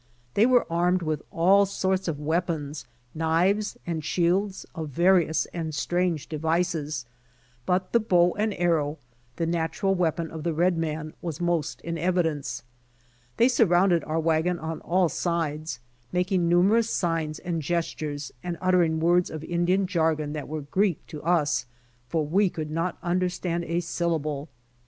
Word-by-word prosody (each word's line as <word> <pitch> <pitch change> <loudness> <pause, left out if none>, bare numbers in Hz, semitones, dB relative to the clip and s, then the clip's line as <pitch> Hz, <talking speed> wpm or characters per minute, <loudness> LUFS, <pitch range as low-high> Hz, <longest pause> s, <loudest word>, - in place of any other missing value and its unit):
They 220 +4 +4
were 250 -1 +4
armed 175 +2 +1
with 155 -2 -1
all 195 +4 +4
sorts 190 -1 -1
of 155 -4 -2
weapons, 160 -1 -2 0.3
knives 175 +6 +1
and 165 -3 -3
shields 185 +5 0
of 160 -2 -5
various 170 +1 +3
and 160 -3 -3
strange 175 0 0
devices, 160 -3 -1 0.6
but 185 +1 +1
the 235 - +4
bow 180 -5 +3
and 215 +1 0
arrow, 160 -4 +1 0.4
the 165 - -1
natural 165 +3 0
weapon 170 -3 0
of 160 - -6
the 165 0 -1
red 175 +2 +3
man 155 -1 -3
was 165 -2 -4
most 175 -3 -1
in 170 0 -4
evi 180 +2 +2
dence. 145 -7 -3 0.7
They 235 - +5
surrounded 180 - +3
our 160 +1 -1
wagon 165 +2 +1
on 160 0 -5
all 180 +1 +2
sides, 155 -5 -2 0.3
making 180 -1 +1
numerous 205 +7 +4
signs 165 -3 -1
and 170 -3 -3
gestures 155 -3 -3
and 175 -1 -3
uttering 175 -4 +2
words 175 +2 +3
of 155 -1 -6
Indian 175 +3 +1
jargon 160 -4 0
that 150 -2 -5
were 155 +1 -4
Greek 185 +4 0
to 150 -3 -7
us, 155 -6 +1 0.4
for 160 -2 0
we 190 +6 +3
could 155 -3 -5
not 165 +3 -1
understand 175 -1 -1
a 170 +2 -1
syllable. 160 -4 -2
170 Hz, 150 wpm, -26 LUFS, 155-180 Hz, 0.7 s, They